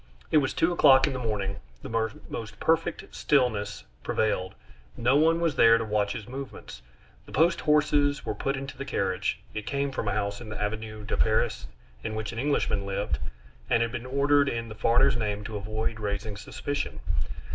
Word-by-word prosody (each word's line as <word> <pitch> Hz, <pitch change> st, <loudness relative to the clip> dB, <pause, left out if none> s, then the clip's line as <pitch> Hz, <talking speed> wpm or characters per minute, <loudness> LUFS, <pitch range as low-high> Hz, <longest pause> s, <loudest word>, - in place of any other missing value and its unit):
It -, -, +5 dB
was 135 Hz, -3 st, +2 dB
two 165 Hz, -, +3 dB
o'clock 135 Hz, -5 st, +7 dB
in 145 Hz, -, -1 dB
the 130 Hz, -, -3 dB
morning, 100 Hz, -4 st, -2 dB, 0.3 s
the 115 Hz, 0 st, 0 dB, 0.2 s
most 110 Hz, -2 st, -6 dB
perfect 165 Hz, +1 st, 0 dB
stillness 110 Hz, -8 st, +1 dB, 0.2 s
prevailed, 95 Hz, -4 st, 0 dB, 0.4 s
no 120 Hz, +4 st, +3 dB
one 165 Hz, +3 st, +4 dB
was 165 Hz, -4 st, +1 dB
there 115 Hz, 0 st, +7 dB
to 115 Hz, -, -2 dB
watch 105 Hz, -1 st, 0 dB
his 110 Hz, -, -7 dB
movements. 130 Hz, -, -8 dB, 0.5 s
The -, -, -12 dB
post 165 Hz, +5 st, +3 dB
horses 150 Hz, -1 st, +3 dB
were -, -, -1 dB
put 135 Hz, 0 st, -2 dB
into 135 Hz, 0 st, -6 dB
the 140 Hz, -, -5 dB
carriage 95 Hz, -7 st, -1 dB
(it 110 Hz, -1 st, -5 dB
came 140 Hz, 0 st, -1 dB
from 120 Hz, -4 st, -3 dB
a 100 Hz, -, +1 dB
house 100 Hz, 0 st, -2 dB
in 115 Hz, -, -8 dB
the 110 Hz, -, -6 dB
Avenue 110 Hz, 0 st, -4 dB
de 105 Hz, -, -2 dB
Paris 110 Hz, -, +1 dB, 0.4 s
in 110 Hz, -, -3 dB
which 110 Hz, -1 st, -3 dB
an 115 Hz, -, -5 dB
Englishman 135 Hz, -7 st, +1 dB
lived, 100 Hz, -8 st, -2 dB, 0.5 s
and 115 Hz, -1 st, +4 dB
had 115 Hz, -, -2 dB
been 120 Hz, +1 st, -5 dB
ordered 140 Hz, +1 st, +3 dB
in 115 Hz, 0 st, -3 dB
the -, -, -6 dB
foreigner's 115 Hz, +3 st, +3 dB
name 105 Hz, -2 st, -2 dB
to 110 Hz, +1 st, -6 dB
avoid 110 Hz, +2 st, -3 dB
raising 100 Hz, 0 st, -3 dB
suspicion). 145 Hz, +7 st, -4 dB
115 Hz, 190 wpm, -27 LUFS, 105-140 Hz, 0.5 s, o'clock